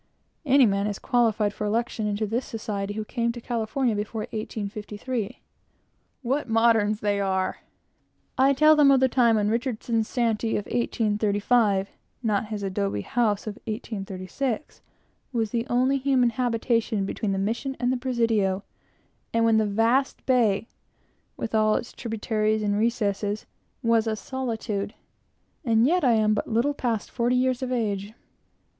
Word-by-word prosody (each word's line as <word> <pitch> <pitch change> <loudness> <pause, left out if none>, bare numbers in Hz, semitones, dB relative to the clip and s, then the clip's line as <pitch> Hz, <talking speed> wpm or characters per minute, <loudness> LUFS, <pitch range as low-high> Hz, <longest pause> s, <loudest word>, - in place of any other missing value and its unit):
Any 275 0 +6
man 200 -1 +1
is 205 -2 -3
qualified 225 -5 +1
for 210 - -3
election 225 0 -1
into 210 +1 -1
the 225 +4 -1
society 205 -4 -4
who 215 0 -3
came 235 +1 -1
to 240 - -7
California 235 +1 -1
before 215 +2 -3
1853. 215 +2 -5 0.8
What 260 +1 -1
moderns 225 -2 +3
they 205 -1 +1
are! 190 -1 -1 0.8
I 270 +2 +4
tell 305 +3 +6
them 295 -2 +6
of 270 -1 +6
the 260 - +4
time 240 -3 +3
when 210 0 +1
Richardson's 230 -2 -1
shanty 230 -2 0
of 205 - -4
1835 210 -2 +1 0.3
not 215 -1 0
his 210 -2 -5
adobe 195 - -1
house 210 - 0
of 215 -1 -6
1836 215 +4 -4 0.5
was 225 -4 -1
the 235 +1 -1
only 260 +3 +2
human 260 -3 +2
habitation 230 -4 0
between 200 +1 -2
the 195 - -1
Mission 235 +7 -2
and 250 0 +1
the - - 0
Presidio, 225 -6 0 0.7
and 230 0 +2
when 225 -1 +4
the 215 -1 +2
vast 230 +6 +1
bay, 230 -5 +2 0.7
with 225 - -4
all 215 -1 +3
its 240 - -4
tributaries 215 -2 -1
and 205 -1 +1
recesses, 210 -2 -1 0.4
was 230 -1 +3
a 220 - 0
solitude, 220 -4 -4 0.7
and 230 -3 +3
yet 350 +4 +2
I 250 -3 +5
am 215 -1 +3
but 210 - -2
little 235 +6 +1
past 235 -6 -2
forty 240 +1 +1
years 255 0 +1
of 255 -1 -3
age. 210 -4 -2
225 Hz, 150 wpm, -25 LUFS, 210-245 Hz, 0.8 s, Any